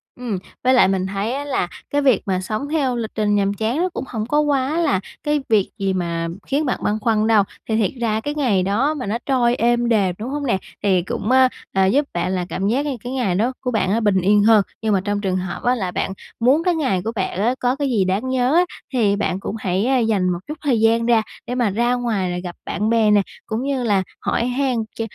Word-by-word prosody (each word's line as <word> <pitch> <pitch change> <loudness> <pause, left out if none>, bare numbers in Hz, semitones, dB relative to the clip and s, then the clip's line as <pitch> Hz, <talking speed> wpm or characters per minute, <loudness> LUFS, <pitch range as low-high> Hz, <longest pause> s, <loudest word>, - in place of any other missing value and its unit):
Ừm, 240 -6 -3 0.3
với 255 +1 +4
lại 245 - +6
mình 190 -1 0
thấy 200 +5 -2
á 285 +1 -3
là 265 -10 -1 0.2
cái 290 - +1
việc 265 -7 +3
mà 185 -2 0
sống 215 +9 -4
theo 275 -6 0
lịch 225 -2 -3
trình 210 -1 +1
nhàm 200 0 +1
chán 220 +6 -1
nó 360 +3 +1
cũng - - -4
hổng 220 -3 -3
có 295 +6 +1
quá 290 0 +1
là 195 - +2 0.2
cái 295 -1 +1
việc 210 -4 +3
gì 195 -1 0
mà 170 -2 -2 0.2
khiến 290 +3 0
bạn 255 - -1
băn 210 +1 0
khoăn 220 -1 +2
đâu. 220 -3 +5 0.3
Thì 220 - +1
thiệt 210 -5 +1
ra 220 -2 +1
cái 290 +3 -3
ngày 230 -11 +2
đó 230 +11 +1
mà 275 -5 -5
nó 210 +3 -1
trôi 245 -3 +2
êm 240 0 +1
đềm, 195 -6 +2
đúng 230 - -4
hông 285 +1 -3
nè? 235 -7 +2 0.3
Thì 190 -3 +3
cũng, 205 +6 -3
á, 260 0 +6 0.2
à, 190 0 +2
giúp 275 +10 +2
bạn 175 +1 -1
là 180 -2 -1
cảm 195 - -2
giác 265 +7 +1
như 275 -4 -2
cái 245 - -5
ngày 225 -9 0
đó 235 +6 +1
của 250 - -2
bạn 220 0 +1
bình 190 -3 +3
yên 205 +2 +4
hơn. 220 -1 +6 0.2
Nhưng 220 -2 +1
mà 190 - +2
trong 205 0 -1
trường 185 -2 0
hợp 180 -1 -5
á 245 +1 +3
là 190 -7 -3
bạn 190 - -2 0.3
muốn 265 +7 +3
cái 355 -1 +2
ngày 260 - 0
của 225 - -1
bạn 195 -2 -2
á 240 +4 +2
có 250 +1 +1
cái 280 -1 -1
gì 210 -7 +2
đáng 200 +8 -1
nhớ 260 +2 +1
á, 355 +1 +5 0.3
thì 210 -5 +2
bạn 195 -2 -1
cũng 195 - -5
hãy 220 +7 +1
dành 195 -4 +1
một 175 -1 -1
chút 300 0 -6
thời 265 -7 +1
gian 225 +1 +3
ra 230 -2 +4 0.3
để 245 - -3
mà 240 -4 +2
ra 240 +5 +1
ngoài 225 -7 -1
là 175 - -3
gặp 175 -1 -6
bạn 210 +1 -1
bè 225 -2 +3
nè, 205 -1 +5 0.2
cũng 220 +3 -3
như 270 -2 -1
là 200 -4 +2 0.2
hỏi 235 - 0
han 255 +1 0 0.2
ch - - -3
225 Hz, 260 wpm, -21 LUFS, 195-255 Hz, 0.3 s, lại